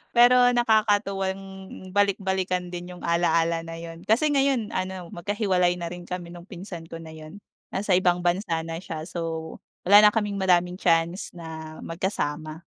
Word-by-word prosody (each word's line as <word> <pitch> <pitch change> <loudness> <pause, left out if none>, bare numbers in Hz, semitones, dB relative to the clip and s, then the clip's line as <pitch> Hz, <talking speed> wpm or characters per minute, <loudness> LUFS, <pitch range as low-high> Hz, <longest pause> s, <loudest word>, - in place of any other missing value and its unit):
Pero, 245 +1 +7 0.2
nakakatuwang 205 -4 +2 0.5
balik-balikan 190 -2 0
din 175 0 -6
yung - - -13
ala-ala 170 -1 +2
na 165 0 -7
yun. 165 0 -8
Kasi 290 +8 +3
ngayon 270 -6 +1
ano, 185 -2 -4
magkahiwalay 185 -1 +1
na 170 -1 -5
rin 175 0 -8
kami 175 -1 -6
nung 175 +1 -11
pinsan 175 -4 -8
ko 165 - -9
na 160 - -10
yun. 160 +5 -11 0.3
Nasa 195 0 -1
ibang 180 -1 +2
bansa 175 -2 0
na 165 0 -5
siya. 165 -4 -6
So, 165 -1 -5 0.3
wala 205 +3 +8
na 210 0 +6
kaming 205 -2 -1
maraming 180 -1 +2
chance 170 +1 +1
na 160 -2 -8
magkasama. 160 -3 -3
180 Hz, 155 wpm, -25 LUFS, 165-200 Hz, 0.5 s, wala